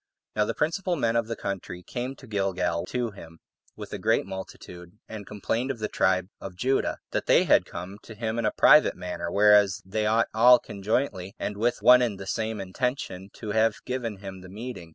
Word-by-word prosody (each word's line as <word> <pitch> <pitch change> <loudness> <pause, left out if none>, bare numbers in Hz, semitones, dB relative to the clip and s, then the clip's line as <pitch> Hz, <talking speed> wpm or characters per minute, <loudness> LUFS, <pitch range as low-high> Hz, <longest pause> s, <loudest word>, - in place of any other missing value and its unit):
5. 105 - +1
Now - - +4
the - - -2
principal 180 +3 0
men 115 -6 0
of 115 -1 +1
the 115 - -3
country 90 -2 -5
came 125 +5 -5
to 135 - -14
Gilgal 95 -6 -1
to 120 -2 -2
him 85 -4 -13 0.4
with - - -9
a - - -4
great - - +2
multitude, 95 -1 -9
and 105 -3 -8
complained 115 +5 -2
of 135 - -2
the 110 -1 -2
tribe 95 -2 +1
of 95 -2 -8
Judah, 130 +8 0
that - - -2
they - - +5
had - - +4
come 95 +3 -8
to 110 - -12
him 110 +1 -3
in 115 - -1
a - - +1
private 150 - +6
manner; 85 -1 -5
whereas 105 -1 +5
they 105 +3 -1
ought 115 +2 +2
all 120 +3 +7
conjointly, 100 -3 -3
and 105 - -4
with 120 +4 -1
one 125 0 +8
and 110 -6 -1
the 95 - -7
same 110 +1 -2
intention, 95 -1 -3
to 110 -3 -6
have 110 0 +2
given 120 -5 -3
him 95 -1 -9
the 90 - -12
meeting. 105 -4 -8
105 Hz, 210 wpm, -26 LUFS, 95-120 Hz, 0.4 s, one